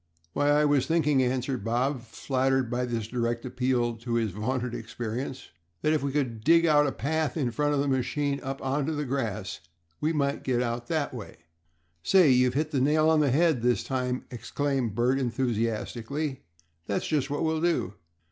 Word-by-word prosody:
"Why, 145 0 +2
I 150 +1 +4
was 145 -3 +2
thinking," 150 -4 +3
answered 130 -2 -1
Bob, 125 +4 0
flattered 130 +1 -1
by 125 +1 0
this 115 -3 -3
direct 120 0 -2
appeal 125 -2 0
to 115 +1 -3
his 115 -3 +1
vaunted 120 +5 -2
experience, 120 +4 -5 0.3
"that 155 - +3
if 155 - +1
we 140 0 -1
could 125 -6 -2
dig 165 +4 +5
out 150 -2 +4
a - - 0
path 155 0 -1
in 130 -6 0
front 145 +3 +1
of - - +1
the 140 - 0
machine 140 +2 0
up 135 0 -4
onto 145 +3 0
the 150 0 -2
grass 110 -7 -3 0.4
we 155 +2 +1
might 140 -2 0
get 130 - 0
it - - +2
out 120 0 -3
that 155 -5 -1
way." 115 -5 -8 0.6
"Say! 180 - +5
you've 125 0 +3
hit 155 +1 0
the 135 -4 +1
nail 155 +3 +4
on 160 - +4
the 145 -2 +3
head 155 -1 +3
this 120 0 +2
time!" 125 -1 -2
exclaimed 130 -2 -2
Bert, 125 +4 +2
enthusiastically. 120 +3 -2 0.4
"That's 100 - -1
just 150 -3 0
what 145 +3 -1
we'll 160 0 0
do. 170 - 0
130 Hz, 185 wpm, -27 LUFS, 120-145 Hz, 0.6 s, dig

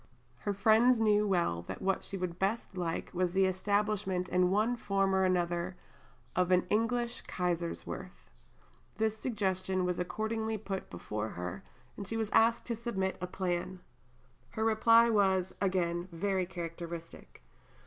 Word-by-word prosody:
Her 205 - -2
friends 225 +4 +5
knew 210 -1 +3
well 170 - +1
that - - -5
what 195 0 0
she 195 - -5
would 180 -1 -4
best 200 +1 -1
like 170 -3 -3
was 180 -1 0
the 190 0 +4
establishment 190 -1 0
in 180 0 +3
one 215 +5 +2
form 195 -4 0
or 190 0 +3
another 175 0 0 0.6
of 180 0 +2
"an 180 -1 +4
English 235 +2 0
Kaiserswerth." 170 - -4 0.7
This 220 0 +1
suggestion 190 -5 -1
was 180 -1 -1
accordingly 220 +4 -2
put 195 -2 -5
before 105 +5 -4
her, 90 -1 -5 0.3
and 200 - -7
she 225 - -2
was 220 -2 -1
asked 230 +1 +4
to 235 - -2
submit 205 -5 -2
a 180 - -2
plan. 180 0 -2 0.7
Her 220 - -2
reply 230 +1 +5
was, 190 -3 +2
again, 175 -2 0
very 185 +2 -1
characteristic. 170 - -7
190 Hz, 145 wpm, -32 LUFS, 180-215 Hz, 0.7 s, friends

